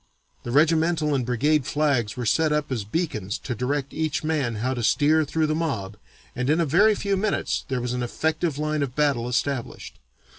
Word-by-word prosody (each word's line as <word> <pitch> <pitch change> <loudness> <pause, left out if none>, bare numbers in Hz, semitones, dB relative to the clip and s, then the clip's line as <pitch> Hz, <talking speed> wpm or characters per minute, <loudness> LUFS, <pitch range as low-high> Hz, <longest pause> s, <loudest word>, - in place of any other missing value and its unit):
The - - -7
regimental 160 +2 +2
and 135 -2 +1
brigade 135 +4 +1
flags 140 -9 0
were 125 - -3
set 155 +7 +2
up 150 -1 -1
as 120 -5 -1
beacons 110 - -3
to 125 - -5
direct 135 +4 -2
each 155 -1 -2
man 150 -7 -1
how 125 +5 -1
to 125 - -3
steer 155 +7 +3
through 160 +2 0
the 155 - 0
mob 135 -12 -2 0.4
and 125 +2 -1
in 155 +3 +3
a 170 - +2
very 200 +9 +4
few 200 0 -1
minutes 200 +1 -1
there 130 -3 -2
was 125 0 -2
an 125 - -2
effective 155 +4 -1
line 150 0 -1
of 135 -3 -3
battle 140 -5 +1
established. 125 - -3
145 Hz, 195 wpm, -24 LUFS, 125-155 Hz, 0.4 s, very